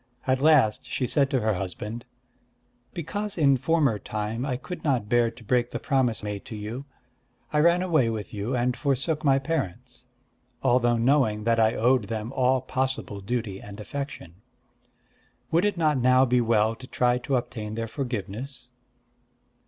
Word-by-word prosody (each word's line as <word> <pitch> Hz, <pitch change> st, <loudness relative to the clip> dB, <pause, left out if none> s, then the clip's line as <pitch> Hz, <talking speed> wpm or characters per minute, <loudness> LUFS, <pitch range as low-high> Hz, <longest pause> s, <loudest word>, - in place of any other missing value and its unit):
At 130 Hz, 0 st, +1 dB
last 150 Hz, -8 st, +4 dB
she 130 Hz, -, -1 dB
said 140 Hz, +2 st, +2 dB
to 130 Hz, -3 st, +1 dB
her 110 Hz, 0 st, +1 dB
husband: 105 Hz, +5 st, -5 dB, 0.9 s
"Because 200 Hz, +5 st, -4 dB
in 140 Hz, -4 st, +5 dB
former 135 Hz, -4 st, +1 dB
time 110 Hz, +6 st, -3 dB
I 125 Hz, -3 st, -1 dB
could 180 Hz, +7 st, -8 dB
not 130 Hz, -8 st, +1 dB
bear 120 Hz, +1 st, +3 dB
to 115 Hz, +1 st, -14 dB
break 120 Hz, +2 st, +1 dB
the -, -, -4 dB
promise 125 Hz, -7 st, +1 dB
made 105 Hz, -1 st, -4 dB
to 110 Hz, -, -7 dB
you, 110 Hz, +6 st, -6 dB, 0.7 s
I 150 Hz, -, +3 dB
ran 170 Hz, +3 st, +4 dB
away 155 Hz, -10 st, +2 dB
with 110 Hz, -3 st, -5 dB
you 105 Hz, +5 st, -2 dB
and 125 Hz, 0 st, +1 dB
forsook 150 Hz, +3 st, -1 dB
my 135 Hz, -2 st, +4 dB
parents, 130 Hz, -, -4 dB, 0.6 s
although 120 Hz, -2 st, +3 dB
knowing 115 Hz, -4 st, +2 dB
that 115 Hz, 0 st, +2 dB
I 110 Hz, 0 st, +3 dB
owed 125 Hz, 0 st, +3 dB
them 110 Hz, +3 st, -4 dB
all 130 Hz, 0 st, +2 dB
possible 130 Hz, -6 st, -3 dB
duty 110 Hz, -2 st, -3 dB
and 105 Hz, +1 st, -10 dB
affection. 105 Hz, -, -7 dB, 1.1 s
Would 170 Hz, +4 st, +3 dB
it 205 Hz, -3 st, 0 dB
not 155 Hz, -4 st, +2 dB
now 130 Hz, +1 st, +5 dB
be 125 Hz, -1 st, +2 dB
well 110 Hz, -1 st, +2 dB
to 130 Hz, -, -11 dB
try 125 Hz, -1 st, +1 dB
to 135 Hz, +2 st, -1 dB
obtain 110 Hz, -3 st, -3 dB
their 115 Hz, 0 st, -3 dB
forgiveness?" 125 Hz, +1 st, -5 dB
125 Hz, 165 wpm, -26 LUFS, 110-135 Hz, 1.1 s, in